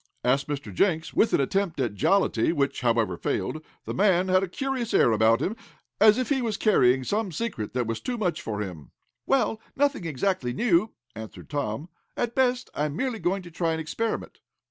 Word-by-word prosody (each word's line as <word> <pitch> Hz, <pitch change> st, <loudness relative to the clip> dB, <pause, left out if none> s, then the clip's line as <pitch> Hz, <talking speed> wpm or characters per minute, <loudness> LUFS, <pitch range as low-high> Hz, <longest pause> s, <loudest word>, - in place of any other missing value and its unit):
asked 135 Hz, +2 st, +2 dB
Mr. 140 Hz, -8 st, -5 dB
Jenks, 160 Hz, -, +1 dB
with 225 Hz, -, +3 dB
an -, -, +3 dB
attempt 175 Hz, +4 st, 0 dB
at 120 Hz, -6 st, 0 dB
jollity, 120 Hz, -, +2 dB
which, 140 Hz, -5 st, -1 dB
however, 115 Hz, -7 st, +1 dB
failed. 155 Hz, -, -2 dB, 0.2 s
The -, -, -4 dB
man 190 Hz, -2 st, +3 dB
had 185 Hz, 0 st, +4 dB
a 195 Hz, -, -1 dB
curious 255 Hz, +4 st, -2 dB
air 120 Hz, -, +5 dB
about 110 Hz, +1 st, +3 dB
him, 210 Hz, -, -1 dB, 0.4 s
as 215 Hz, +1 st, +7 dB
if 255 Hz, -, -1 dB
he 275 Hz, -2 st, +1 dB
was 225 Hz, -4 st, -1 dB
carrying 130 Hz, -, +4 dB
some 205 Hz, -, -1 dB
secret 155 Hz, -, -4 dB
that 125 Hz, -1 st, +1 dB
was 115 Hz, 0 st, -3 dB
too 250 Hz, -1 st, -3 dB
much 175 Hz, -6 st, -1 dB
for 105 Hz, -8 st, -4 dB
him. 85 Hz, -9 st, -7 dB, 0.4 s
"Well, 250 Hz, -5 st, +1 dB
nothing 280 Hz, -10 st, +1 dB
exactly 155 Hz, -4 st, -1 dB
new," 210 Hz, -, +2 dB, 0.3 s
answered 110 Hz, +6 st, -10 dB
Tom. 145 Hz, 0 st, -2 dB, 0.3 s
"At 240 Hz, -1 st, -1 dB
best 250 Hz, -1 st, +1 dB
I 150 Hz, -, -1 dB
am 150 Hz, -1 st, -3 dB
merely 250 Hz, +2 st, -2 dB
going 190 Hz, +1 st, -1 dB
to 175 Hz, -, -11 dB
try 165 Hz, 0 st, 0 dB
an 160 Hz, -, -2 dB
experiment." 190 Hz, +9 st, -3 dB
170 Hz, 195 wpm, -26 LUFS, -, 0.4 s, as